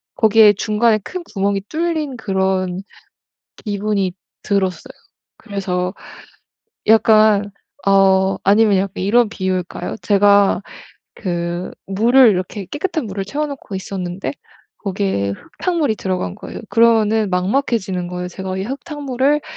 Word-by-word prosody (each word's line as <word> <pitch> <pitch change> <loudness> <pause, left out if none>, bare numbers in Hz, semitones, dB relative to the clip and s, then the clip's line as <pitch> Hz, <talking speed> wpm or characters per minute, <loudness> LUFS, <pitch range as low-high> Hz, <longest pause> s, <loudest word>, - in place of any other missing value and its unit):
거기에 220 -1 +6
중간에 215 +2 +2
큰 360 - -7
구멍이 200 -1 0
뚫린 315 -5 -2
그런 190 -3 -1 0.8
기분이 205 -2 -1 0.3
들었어요. 190 -4 -1 0.4
그래서 190 -3 -3 0.9
약간 215 -2 +5 0.3
어 195 -1 +4
아니면 205 0 +4
약간 190 -1 -2
이런 230 +4 +4
비유일까요? 185 -3 -3
제가 200 -1 +4 0.5
그 175 -1 -3
물을 235 +6 +5
이렇게 190 +1 -2
깨끗한 315 -2 -2
물을 195 -1 -4
채워 295 +8 -2
놓고 275 -8 -7
있었는데 190 -1 -4 0.5
거기에 190 - -1 0.3
흙탕물이 330 -11 +1
들어간 185 - -3
거예요. - - -8
그러면은 220 -2 +3
막막해지는 190 -2 0
거예요. 180 0 -5
제가 190 +1 -5
'이 190 - -2
흙탕물을 280 +2 -1
200 Hz, 280 characters per minute, -19 LUFS, 190-225 Hz, 0.9 s, 거기에